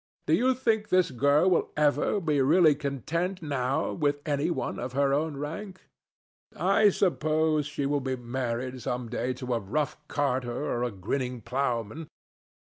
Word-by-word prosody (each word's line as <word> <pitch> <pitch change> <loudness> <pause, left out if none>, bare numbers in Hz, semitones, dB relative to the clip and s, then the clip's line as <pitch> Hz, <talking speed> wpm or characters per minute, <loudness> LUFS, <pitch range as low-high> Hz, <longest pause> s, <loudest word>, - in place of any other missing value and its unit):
Do 155 - +1
you 255 +9 +3
think 225 -4 0
this 185 -5 +3
girl 140 +7 +3
will 175 - +2
ever 150 +6 +2
be 150 -6 +1
really 155 +3 +5
content 160 +6 -3
now 140 +1 -1
with 145 -3 0
any 145 0 0
one 170 - -3
of 125 +1 -5
her 140 0 +2
own 150 0 0
rank? 185 +7 -6 0.7
I 215 -1 +4
suppose 155 -5 +1
she 145 -1 -3
will 145 0 0
be 130 0 -2
married 125 0 -3
some 125 0 -3
day 125 +1 -2
to 125 0 -4
a 115 - +1
rough 145 +9 -2
carter 130 -4 -1
or 120 - -1
a 125 - 0
grinning 125 +5 -3
ploughman. 125 +4 -2
145 Hz, 160 wpm, -28 LUFS, 125-160 Hz, 0.7 s, really